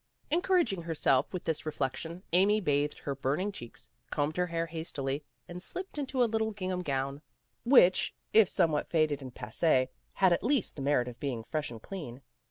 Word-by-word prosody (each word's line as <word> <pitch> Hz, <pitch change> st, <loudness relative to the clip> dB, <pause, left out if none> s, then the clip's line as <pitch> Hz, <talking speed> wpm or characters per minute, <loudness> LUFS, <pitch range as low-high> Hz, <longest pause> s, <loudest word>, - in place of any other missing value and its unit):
Encouraging 340 Hz, -, +2 dB
herself 150 Hz, -5 st, +1 dB
with 180 Hz, -, -4 dB
this 160 Hz, -2 st, -2 dB
reflection, 155 Hz, +4 st, -3 dB
Amy 200 Hz, +4 st, +5 dB
bathed 145 Hz, -5 st, 0 dB
her 140 Hz, -, -4 dB
burning 140 Hz, +9 st, -1 dB
cheeks, 120 Hz, -12 st, -10 dB, 0.2 s
combed 145 Hz, +2 st, -1 dB
her 180 Hz, 0 st, +1 dB
hair 165 Hz, -1 st, -1 dB
has 165 Hz, 0 st, -5 dB
tily, 135 Hz, +1 st, -2 dB, 0.3 s
and 175 Hz, +1 st, -7 dB
slipped 370 Hz, -, -6 dB
into 265 Hz, -2 st, +1 dB
a -, -, +5 dB
little 220 Hz, -1 st, 0 dB
gingham 185 Hz, -3 st, -3 dB
gown 135 Hz, -3 st, -2 dB
PEGGY 150 Hz, -, -21 dB
RAYMOND'S -, -, -47 dB
WAY -, -, -4 dB
which, 185 Hz, -9 st, +6 dB, 0.2 s
if 215 Hz, -3 st, +7 dB
somewhat 160 Hz, -5 st, +1 dB
faded 155 Hz, -3 st, +1 dB
and 130 Hz, -2 st, -9 dB
passee, 130 Hz, +2 st, +1 dB, 0.2 s
had 190 Hz, -2 st, +4 dB
at -, -, 0 dB
least 260 Hz, -2 st, +1 dB
the 140 Hz, -, -6 dB
merit 135 Hz, -3 st, +2 dB
of 125 Hz, -1 st, -8 dB
being 125 Hz, -5 st, -3 dB
fresh 150 Hz, +4 st, -3 dB
and 115 Hz, -2 st, -10 dB
clean. 140 Hz, -9 st, -7 dB
165 Hz, 195 wpm, -30 LUFS, 140-195 Hz, 0.3 s, if